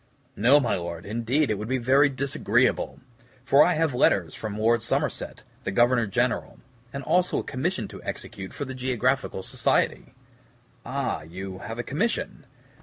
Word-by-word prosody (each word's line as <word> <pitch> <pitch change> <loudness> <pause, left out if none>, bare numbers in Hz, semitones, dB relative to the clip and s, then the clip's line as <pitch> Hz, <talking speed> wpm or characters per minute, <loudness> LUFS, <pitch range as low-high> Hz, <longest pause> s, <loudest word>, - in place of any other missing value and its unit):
"No, 135 +5 +5
my 130 - 0
Lord; 85 -1 -6
indeed 120 +6 0
it 105 - -1
would 105 - -4
be 130 +2 0
very 135 +4 +4
disagreeable, 135 0 0 0.4
for 140 +2 +6
I 180 - +2
have 160 -3 +1
letters 90 -9 +2
from 105 -2 -5
Lord 115 +1 +3
Somerset, 115 - -2 0.2
the - - -2
Governor 120 +3 +3
General, 120 +4 -1 0.3
and 140 0 -5
also 175 +5 +2
a - - -1
commission 170 +8 -2
to - - -10
execute 95 -1 -6
for 145 - -5
the 130 - -6
Geographical 130 -5 -1
Society." - - 0 0.7
"Ah, - - -2
you 95 +3 -7
have 115 +3 -6
a 120 - -2
commission." 195 - -2
125 Hz, 160 wpm, -26 LUFS, 105-140 Hz, 0.7 s, for